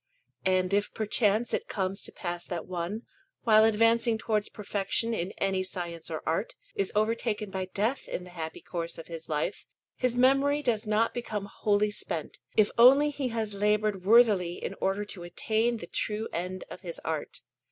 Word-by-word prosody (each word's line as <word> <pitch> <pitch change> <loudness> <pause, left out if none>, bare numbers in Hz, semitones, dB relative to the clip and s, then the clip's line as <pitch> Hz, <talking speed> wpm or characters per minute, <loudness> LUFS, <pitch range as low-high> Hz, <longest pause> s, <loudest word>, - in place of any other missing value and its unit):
And 185 0 +2
if 205 +1 +1
perchance 215 +1 +1
it - - -1
comes 190 0 -2
to - - -11
pass 175 -1 -4
that 175 -3 -4
one, 185 +5 -4 0.4
while 215 -1 +6
advancing 230 +1 +3
towards 215 -2 -1
perfection 210 +2 -1
in 185 -3 -2
any 195 -1 +1
science 175 -3 -5
or 160 -1 -4
art, 165 +7 -1 0.2
is 195 - 0
overtaken 215 -1 0
by 190 0 -2
death 215 +8 -1
in 180 - -4
the 180 - -12
happy 160 -2 -6
course 170 -1 -4
of 165 - -9
his 165 -1 -7
life, 150 -1 -2 0.3
his 250 -2 0
memory 275 +3 +4
does 225 -4 0
not 215 +2 +2
become 215 -4 -3
wholly 205 +1 +1
spent, 165 -6 -4 0.2
if 215 -1 +5
only 275 +5 +7
he 280 -2 -2
has 225 -3 -2
laboured 210 -1 +1
worthily 205 -5 +5
in - - -5
order 195 +2 0
to 200 -3 -8
attain 220 +7 0
to - - -7
the - - -27
true 215 +1 -1
end 180 +2 -3
of - - -8
his 175 -4 -6
art. 160 -2 -3
205 Hz, 180 wpm, -29 LUFS, 180-225 Hz, 0.4 s, only